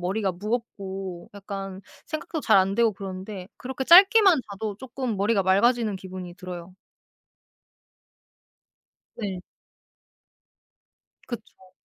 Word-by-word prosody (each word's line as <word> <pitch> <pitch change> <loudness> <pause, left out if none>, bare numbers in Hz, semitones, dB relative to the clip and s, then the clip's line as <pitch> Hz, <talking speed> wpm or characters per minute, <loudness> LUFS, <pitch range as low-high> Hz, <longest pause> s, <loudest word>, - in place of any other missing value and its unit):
머리가 190 +3 0
무겁고 195 -3 -5
약간 195 -1 -6 0.3
생각도 310 0 -4
잘 220 -7 +4
안되고 200 +4 +3
그런데 190 0 -7
그렇게 265 +1 -5
짧게만 385 - +8
자도 205 0 -4
쪼끔 250 -1 -4
머리가 200 +1 +2
맑아지는 215 +3 +3
기분이 185 -2 -8
들어요. 180 -1 -8 2.4
네. 195 -5 -4 1.9
그쵸. 215 -6 -9
200 Hz, 225 characters per minute, -25 LUFS, 190-235 Hz, 2.4 s, 짧게만